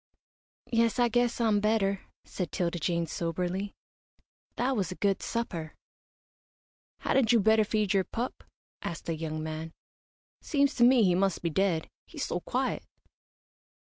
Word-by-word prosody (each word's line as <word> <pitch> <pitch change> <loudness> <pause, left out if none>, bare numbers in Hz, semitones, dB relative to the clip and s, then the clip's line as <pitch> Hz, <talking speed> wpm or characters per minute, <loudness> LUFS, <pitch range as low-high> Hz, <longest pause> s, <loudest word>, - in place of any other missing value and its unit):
"Yes, 230 0 +3
I 240 -1 +4
guess 245 +1 +1
I'm 220 -3 +3
better," 205 -2 +1 0.2
said 180 -4 -4
'Tilda 175 -1 -1
Jane, 170 +1 0
soberly. 180 +4 -3 0.8
"That 260 +2 +1
was 190 -6 -1
a - - -5
good 200 0 +1
supper." 175 -9 -3 1.3
"Hadn't 250 -4 +3
you 235 - +5
better 220 +1 +5
feed 210 -1 0
your 195 -1 +3
pup?" 235 +6 -4 0.4
asked 165 - -5
the 165 - -1
young 155 -1 -4
man. 160 +1 -5 0.7
"Seems 280 -1 +2
to 240 - +2
me 245 -1 +6
he 180 -3 +4
must 190 0 +1
be 170 - 0
dead, 170 -1 +1 0.2
he's - - -4
so - - -2
quiet." - - -1
195 Hz, 145 wpm, -29 LUFS, 170-230 Hz, 1.3 s, me